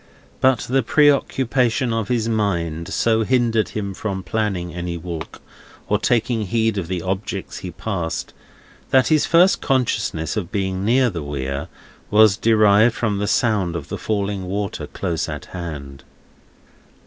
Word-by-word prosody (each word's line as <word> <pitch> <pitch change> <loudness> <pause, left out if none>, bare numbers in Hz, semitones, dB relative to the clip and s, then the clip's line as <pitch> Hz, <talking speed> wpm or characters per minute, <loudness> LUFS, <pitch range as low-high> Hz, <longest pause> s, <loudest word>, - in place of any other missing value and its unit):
But 130 -2 +3
the 135 +2 +1
preoccupation 130 -2 +2
of 115 -2 -1
his 115 -3 0
mind 85 -7 -1
so 110 +1 +2
hindered 115 -4 +1
him 100 -2 -3
from 95 -1 -4
planning 95 -7 -2
any 85 0 -4
walk, 85 -1 -7 0.4
or 105 - +1
taking 115 -1 +1
heed 110 0 +1
of 85 - -4
the 90 -2 -3
objects 95 +2 -4
he - - -6
passed, 90 -7 -4 0.6
that 130 -1 +4
his 155 -2 +3
first 180 +3 +4
consciousness 115 -10 0
of 100 -4 -3
being 95 -1 -2
near 125 +3 +3
the 85 -4 -5
Weir, 70 -1 -4 0.4
was 105 -1 +6
derived 110 +1 +4
from 105 -4 -1
the 105 - -1
sound 100 -8 +1
of 80 -5 -6
the - - -4
falling 100 -2 -2
water 100 +2 -3
close 85 -4 -3
at - - -6
hand. 70 -6 -7
105 Hz, 150 wpm, -21 LUFS, 90-115 Hz, 0.6 s, was